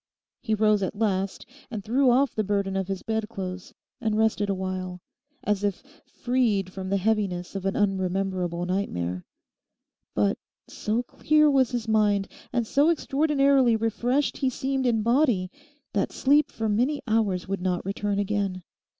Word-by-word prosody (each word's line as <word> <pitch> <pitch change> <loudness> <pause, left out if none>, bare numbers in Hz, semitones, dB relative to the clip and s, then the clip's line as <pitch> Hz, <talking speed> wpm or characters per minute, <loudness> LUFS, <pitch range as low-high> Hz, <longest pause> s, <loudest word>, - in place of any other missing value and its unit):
He 220 -3 0
rose 215 -1 +3
at 190 +1 -3
last 195 -3 -1 0.2
and 220 -5 -5
threw 255 +5 +3
off 265 +3 +3
the 215 - 0
burden 200 -1 -1
of 190 -1 -1
his 195 -1 -4
bedclothes, 195 -5 -4 0.3
and 220 -2 0
rested 220 -2 +1
awhile, 185 -1 -3 0.4
as 205 0 0
if 200 +1 -1 0.2
freed 225 -7 0
from 190 -1 -5
the 200 - +2
heaviness 195 -3 -1
of 195 0 -2
an 195 - -1
unrememberable 185 -3 0
nightmare. 90 - -2 0.9
But 105 -1 +1 0.3
so 220 +3 -2
clear 305 +3 +3
was 265 -3 +3
his 240 -2 -3
mind 205 -3 +2 0.2
and 240 -2 0
so 285 +7 +3
extraordinarily 280 -5 +3
refreshed 240 +5 0
he 265 - +1
seemed 265 +1 -1
in 225 -3 +1
body 235 -7 +2 0.4
that - - 0
sleep 290 +2 +3
for 225 -1 -3
many 250 +8 +1
hours 210 -5 +1
would 195 -1 -3
not 180 -1 -1
return 200 +1 -2
again. 200 -2 -1
210 Hz, 150 wpm, -26 LUFS, 190-245 Hz, 0.9 s, rose